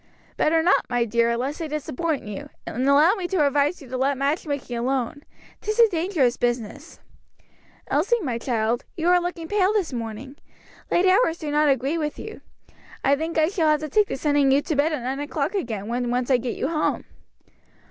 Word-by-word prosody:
"Better 320 Hz, +1 st, +2 dB
not, 360 Hz, -, +3 dB
my 245 Hz, -1 st, +1 dB
dear, 235 Hz, +1 st, +1 dB
lest 270 Hz, +5 st, -3 dB
they 325 Hz, -, -3 dB
disappoint 305 Hz, +1 st, -3 dB
you, 210 Hz, -2 st, -7 dB, 0.2 s
and 255 Hz, +3 st, -1 dB
allow 300 Hz, +6 st, +6 dB
me 375 Hz, -5 st, -3 dB
to 350 Hz, -5 st, +2 dB
advise 285 Hz, +4 st, +1 dB
you -, -, -12 dB
to 255 Hz, +1 st, -4 dB
let 270 Hz, +1 st, +1 dB
match 285 Hz, +5 st, -1 dB
making 280 Hz, -4 st, -3 dB
alone; 255 Hz, +3 st, -2 dB, 0.4 s
'tis 430 Hz, +1 st, -2 dB
a 470 Hz, -1 st, +7 dB
dangerous 330 Hz, -, +1 dB
business. 245 Hz, +5 st, -3 dB, 0.9 s
Elsie, 390 Hz, +12 st, +1 dB
my 245 Hz, -5 st, -2 dB
child, 235 Hz, 0 st, -1 dB
you 330 Hz, +1 st, -1 dB
are 360 Hz, 0 st, +5 dB
looking 345 Hz, -2 st, -4 dB
pale 400 Hz, 0 st, +2 dB
this 380 Hz, -10 st, -1 dB
morning; 235 Hz, +4 st, -6 dB, 0.5 s
late 350 Hz, -, +2 dB
hours 370 Hz, -3 st, +3 dB
do 305 Hz, -3 st, -5 dB
not 300 Hz, 0 st, +3 dB
agree 275 Hz, +5 st, +1 dB
with 300 Hz, -1 st, -3 dB
you. 435 Hz, 0 st, -8 dB, 0.6 s
I 280 Hz, -, +4 dB
think 320 Hz, +3 st, -4 dB
I 315 Hz, 0 st, +3 dB
shall 345 Hz, -5 st, 0 dB
have 305 Hz, -1 st, +2 dB
to 310 Hz, -, -4 dB
take 420 Hz, +6 st, +3 dB
to -, -, -4 dB
sending 285 Hz, -1 st, +2 dB
you 280 Hz, +2 st, +3 dB
to 315 Hz, -, -2 dB
bed 290 Hz, +3 st, +2 dB
at 295 Hz, -6 st, -3 dB
nine 265 Hz, +2 st, -3 dB
o'clock 290 Hz, +7 st, -2 dB
again, 225 Hz, -, -3 dB
when 240 Hz, +1 st, -2 dB
once 245 Hz, +2 st, -1 dB
I 255 Hz, -, +5 dB
get 245 Hz, 0 st, -4 dB
you 270 Hz, -, -2 dB
home." 310 Hz, -2 st, 0 dB
290 Hz, 205 wpm, -24 LUFS, 250-330 Hz, 0.9 s, a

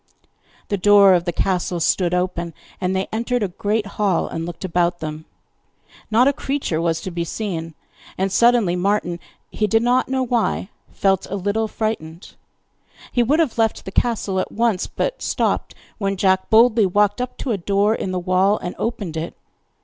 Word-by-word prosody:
The 200 Hz, -, -1 dB
door 200 Hz, 0 st, +7 dB
of 175 Hz, -1 st, +2 dB
the 175 Hz, -, 0 dB
castle 180 Hz, -1 st, -1 dB
stood 175 Hz, +1 st, +1 dB
open, 180 Hz, -2 st, -2 dB, 0.3 s
and 185 Hz, 0 st, 0 dB
they 190 Hz, 0 st, 0 dB
entered 235 Hz, +1 st, -1 dB
a -, -, +1 dB
great 205 Hz, +4 st, -1 dB
hall, 200 Hz, -3 st, 0 dB
and 165 Hz, +1 st, -4 dB
looked 175 Hz, +2 st, -6 dB
about 175 Hz, -1 st, +1 dB
them. 155 Hz, -1 st, -6 dB, 0.8 s
Not 235 Hz, +4 st, +4 dB
a 280 Hz, -, +3 dB
creature 270 Hz, -, -2 dB
was 165 Hz, -1 st, 0 dB
to 185 Hz, -, -5 dB
be 170 Hz, 0 st, -2 dB
seen, 170 Hz, -4 st, -4 dB, 0.4 s
and 190 Hz, +1 st, 0 dB
suddenly 235 Hz, -4 st, +4 dB
Martin 180 Hz, -2 st, 0 dB, 0.3 s
he 210 Hz, -, 0 dB
did 225 Hz, +2 st, +2 dB
not 250 Hz, +2 st, +2 dB
know 260 Hz, 0 st, 0 dB
why 235 Hz, -5 st, 0 dB, 0.2 s
felt 195 Hz, -1 st, +1 dB
a 200 Hz, -, -3 dB
little 205 Hz, +3 st, -1 dB
frightened. 195 Hz, -7 st, -4 dB, 0.8 s
He 245 Hz, -, +2 dB
would 280 Hz, +7 st, +2 dB
have 285 Hz, -8 st, 0 dB
left 225 Hz, -1 st, +1 dB
the 190 Hz, -, -6 dB
castle 205 Hz, -4 st, 0 dB
at -, -, -3 dB
once, 225 Hz, -4 st, 0 dB
but -, -, -3 dB
stopped -, -, -1 dB, 0.2 s
when 195 Hz, -1 st, -1 dB
Jack 190 Hz, 0 st, +2 dB
boldly 225 Hz, -1 st, +5 dB
walked 205 Hz, +4 st, +2 dB
up 250 Hz, -, -5 dB
to 255 Hz, -, -3 dB
a 210 Hz, -, 0 dB
door 200 Hz, +4 st, +2 dB
in 195 Hz, -, -3 dB
the 185 Hz, -, -2 dB
wall 185 Hz, +3 st, +2 dB
and 180 Hz, -, -5 dB
opened 205 Hz, -8 st, -3 dB
it. 160 Hz, +1 st, -4 dB
195 Hz, 180 wpm, -21 LUFS, 180-225 Hz, 0.8 s, door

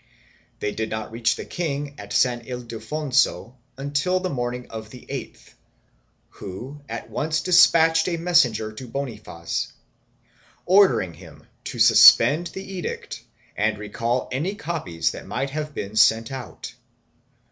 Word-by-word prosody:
They 105 Hz, -, -1 dB
did 110 Hz, +1 st, -3 dB
not 110 Hz, 0 st, -5 dB
reach 115 Hz, +1 st, +1 dB
the -, -, -7 dB
king 145 Hz, -4 st, -3 dB
at -, -, -10 dB
San 120 Hz, -2 st, +2 dB
Ildefonso 125 Hz, +2 st, -1 dB, 0.2 s
until 145 Hz, +7 st, 0 dB
the 185 Hz, -1 st, -3 dB
morning 125 Hz, -1 st, -3 dB
of 110 Hz, -1 st, -7 dB
the 125 Hz, +1 st, -13 dB
8th, -, -, -8 dB, 0.8 s
who 125 Hz, +10 st, -9 dB
at -, -, -6 dB
once 155 Hz, +1 st, -1 dB
despatched 165 Hz, -2 st, +5 dB
a 170 Hz, -2 st, -1 dB
messenger 125 Hz, -11 st, +2 dB
to 125 Hz, +4 st, -9 dB
Bonifaz 115 Hz, -10 st, -5 dB, 0.9 s
ordering 130 Hz, -, +4 dB
him 80 Hz, -3 st, -15 dB, 0.2 s
to -, -, -6 dB
suspend 160 Hz, +4 st, +7 dB
the 190 Hz, -, -8 dB
edict 190 Hz, -3 st, -6 dB, 0.3 s
and 110 Hz, +1 st, 0 dB
recall 115 Hz, +4 st, -2 dB
any 160 Hz, +10 st, -2 dB
copies 165 Hz, -, -2 dB
that -, -, -10 dB
might 135 Hz, 0 st, -3 dB
have 150 Hz, 0 st, -5 dB
been 100 Hz, +2 st, -5 dB
sent 110 Hz, +2 st, +4 dB
out. 130 Hz, -1 st, -8 dB
130 Hz, 135 wpm, -23 LUFS, 110-160 Hz, 0.9 s, suspend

